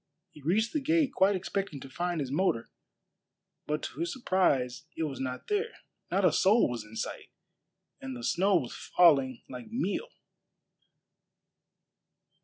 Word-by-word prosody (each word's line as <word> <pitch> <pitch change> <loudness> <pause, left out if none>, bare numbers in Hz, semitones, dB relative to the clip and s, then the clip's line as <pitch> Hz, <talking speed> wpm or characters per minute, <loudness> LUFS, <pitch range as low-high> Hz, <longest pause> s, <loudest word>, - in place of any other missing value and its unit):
He 150 - -14
reached 210 +10 +1
the 305 - +1
gate 315 0 +2
quite 195 +1 +4
expecting 190 -4 -3
to - - -8
find 175 +4 -2
his 135 -2 -4
motor, 145 -8 0 1.0
but 150 +1 -1
to - - -6
his 340 +1 -1
surprise 155 - +1
it 165 - 0
was 140 -4 -3
not 130 -1 -4
there. 420 +2 -1 0.3
Not 195 +1 +2
a 180 - +6
soul 205 +9 +4
was 120 -3 -4
in 105 +1 -13
sight, - - -5 0.7
and 130 -1 -5
the 120 - -8
snow 195 +9 +3
was 130 -9 0
falling 135 -8 +3
like 125 -2 -8
meal. 235 - -1
175 Hz, 150 wpm, -30 LUFS, 130-205 Hz, 1.0 s, a